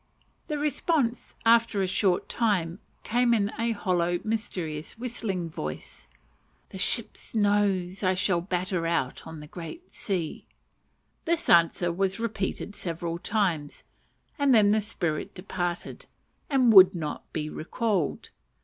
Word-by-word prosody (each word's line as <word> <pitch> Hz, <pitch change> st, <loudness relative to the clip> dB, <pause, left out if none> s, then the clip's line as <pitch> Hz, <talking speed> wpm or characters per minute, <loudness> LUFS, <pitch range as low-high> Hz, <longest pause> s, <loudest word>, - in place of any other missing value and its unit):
The 300 Hz, -, -2 dB
response, 290 Hz, -3 st, 0 dB
after 230 Hz, -2 st, +4 dB
a 190 Hz, -, +2 dB
short 185 Hz, -1 st, +1 dB
time, 190 Hz, -6 st, 0 dB, 0.2 s
came 240 Hz, +1 st, +3 dB
in 205 Hz, -1 st, +1 dB
the 230 Hz, 0 st, +1 dB
hollow 175 Hz, -4 st, 0 dB
mysterious 180 Hz, -8 st, -4 dB
whistling 220 Hz, -7 st, -3 dB
voice, 75 Hz, -, -7 dB, 0.6 s
"The 190 Hz, -, -8 dB
ship's 230 Hz, +3 st, 0 dB
nose 200 Hz, -3 st, +1 dB
I 185 Hz, -2 st, +1 dB
will 175 Hz, -3 st, +2 dB
batter 180 Hz, -1 st, -1 dB
out 150 Hz, -5 st, -1 dB
on 160 Hz, -1 st, -8 dB
the -, -, -9 dB
great 175 Hz, -, -9 dB
sea." 180 Hz, -6 st, -3 dB, 0.8 s
This 340 Hz, +1 st, 0 dB
answer 170 Hz, +1 st, +4 dB
was 195 Hz, +3 st, 0 dB
repeated 215 Hz, -2 st, -3 dB
several 170 Hz, -2 st, -4 dB
times, 175 Hz, -9 st, -1 dB, 0.6 s
and 280 Hz, -3 st, +5 dB
then 205 Hz, -2 st, +5 dB
the 215 Hz, +1 st, +3 dB
spirit 170 Hz, -7 st, -3 dB
departed, 175 Hz, -2 st, -4 dB, 0.4 s
and 255 Hz, -5 st, +4 dB
would 190 Hz, -1 st, +9 dB
not 155 Hz, -3 st, -5 dB
be 150 Hz, -1 st, -3 dB
recalled. 185 Hz, -, -2 dB
190 Hz, 130 wpm, -27 LUFS, 170-225 Hz, 0.8 s, would